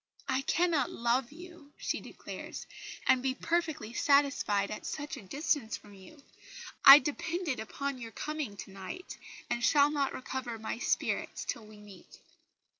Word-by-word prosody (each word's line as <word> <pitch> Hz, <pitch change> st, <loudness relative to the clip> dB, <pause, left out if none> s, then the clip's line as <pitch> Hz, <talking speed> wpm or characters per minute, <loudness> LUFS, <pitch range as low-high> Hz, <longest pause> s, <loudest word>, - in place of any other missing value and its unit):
"I 260 Hz, -, +1 dB
cannot 330 Hz, +1 st, +2 dB
love 240 Hz, +2 st, 0 dB
you," 340 Hz, -2 st, -13 dB
she -, -, -2 dB
declares, -, -, -8 dB, 0.4 s
"and 255 Hz, -, +4 dB
be 260 Hz, 0 st, 0 dB
perfectly 315 Hz, -8 st, -1 dB
satisfied 275 Hz, -9 st, +2 dB
at 210 Hz, -, -5 dB
such 295 Hz, +1 st, -4 dB
a 265 Hz, -, -9 dB
distance 260 Hz, -, -1 dB
from 205 Hz, -, -16 dB
you. 275 Hz, +10 st, -15 dB, 0.6 s
I 275 Hz, 0 st, +13 dB
depended 305 Hz, +2 st, -2 dB
upon 275 Hz, +4 st, -4 dB
your 230 Hz, -1 st, -6 dB
coming 300 Hz, -9 st, -4 dB
to 195 Hz, -, -8 dB
night, 195 Hz, -, -8 dB, 0.3 s
and 240 Hz, 0 st, -2 dB
shall 290 Hz, +3 st, +5 dB
not 280 Hz, -2 st, 0 dB
recover 255 Hz, -2 st, -4 dB
my 220 Hz, +1 st, -4 dB
spirits -, -, -1 dB
till 220 Hz, -2 st, -4 dB
we 215 Hz, 0 st, -14 dB
meet." 205 Hz, -3 st, -14 dB
270 Hz, 150 wpm, -31 LUFS, 225-300 Hz, 0.6 s, I